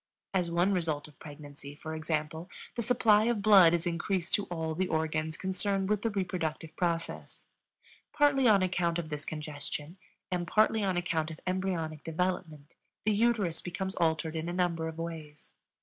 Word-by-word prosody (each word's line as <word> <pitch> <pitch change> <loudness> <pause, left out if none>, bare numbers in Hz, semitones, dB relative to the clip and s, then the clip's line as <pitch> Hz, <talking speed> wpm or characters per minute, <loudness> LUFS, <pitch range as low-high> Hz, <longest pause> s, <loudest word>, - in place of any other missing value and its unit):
As 180 -3 +1
one 175 +4 +2
result 160 -5 -1
of 150 -3 -19
pregnancy, 145 -1 -10
for 160 +1 -7
example, 155 +2 -3 0.2
the 235 - -2
supply 220 -2 +4
of 230 -4 0
blood 195 -5 +8
is 170 0 0
increased 170 +1 -1
to 205 - +3
all 160 -2 -3
the 185 +3 0
organs 155 -1 -1
concerned 195 +1 -1
with 210 -1 +1
the 230 - +1
reproductive 175 -5 -3
process. 170 -2 -3 0.7
Partly 280 -3 +4
on 200 -4 +6
account 175 -2 +1
of 165 -2 -4
this 150 -1 -5
congestion 150 +2 -5 0.3
and 175 -1 -1
partly 215 +1 +3
on 190 -2 +1
account 165 -3 0
of 160 0 -8
embryonic 180 -5 -2
development, 165 -3 -3 0.3
the 215 - +3
uterus 210 -6 +2
becomes 190 +2 -4
altered 160 -1 +1
in 160 +1 -2
a - - -3
number 175 -3 0
of 160 0 -6
ways. 160 -3 -7
170 Hz, 165 wpm, -30 LUFS, 160-190 Hz, 0.7 s, blood